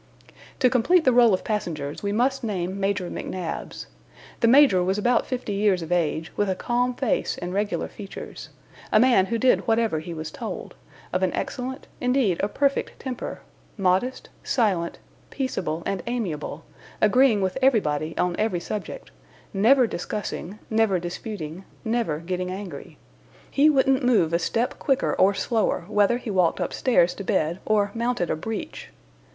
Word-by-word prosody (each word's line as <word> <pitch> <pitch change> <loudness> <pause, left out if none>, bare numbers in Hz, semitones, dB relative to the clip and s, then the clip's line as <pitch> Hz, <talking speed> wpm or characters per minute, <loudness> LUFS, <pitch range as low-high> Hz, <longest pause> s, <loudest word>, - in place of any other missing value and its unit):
To 255 - +4
complete 260 +8 +3
the 255 - +5
roll 240 -2 +6
of 185 - +1
passengers, 155 -9 -3
we 200 - -1
must 255 +5 +1
name 190 -3 -2
Major 195 -2 0
McNabbs. 180 -1 -5 0.5
The 230 - +3
Major 250 -8 +6
was 190 +2 0
about 240 +4 +2
fifty 250 -5 -3
years 200 -3 +2
of 165 - -8
age, 165 -2 0
with 205 -1 0
a 190 - 0
calm 245 +4 0
face 255 -4 0
and 180 +1 -5
regular 205 +1 -1
features 200 -2 -9 0.4
a 215 - +5
man 235 -6 +4
who 230 - -1
did 255 +2 +2
whatever 225 -7 +2
he 165 +2 -7
was 155 0 -5
told, - - -6 0.4
of - - +1
an - - +2
excellent, 260 0 -4
indeed, 250 -8 +1
a 200 - +1
perfect 280 +5 -1
temper; 255 -2 -5 0.4
modest, 195 +6 0
silent, 190 -9 0 0.3
peaceable, 185 - -3
and 195 - -2
amiable, 180 -10 -3 0.3
agreeing 230 +1 +4
with 190 +5 -1
everybody 165 - +1
on 180 -1 +1
every 215 -5 +1
subject, 200 - -6 0.4
never 245 +6 +5
discussing, 205 -1 -5
never 220 -3 +3
disputing, 175 -1 -6 0.2
never 225 -9 0
getting 180 +2 -3
angry. 185 -6 -7 0.5
He 290 +2 +5
wouldn't 270 -2 +3
move 215 -10 +3
a 170 - +3
step 230 +8 -1
quicker, 270 -2 +1
or 195 +1 +3
slower, 210 -2 0
whether 210 +2 +3
he 245 -3 -5
walked 180 -4 +2
upstairs 180 -9 +2
to 200 - -7
bed 175 -3 0
or 205 -2 +2
mounted 235 -6 -1
a - - +1
breach. 215 +7 -6
205 Hz, 155 wpm, -24 LUFS, 180-245 Hz, 0.5 s, roll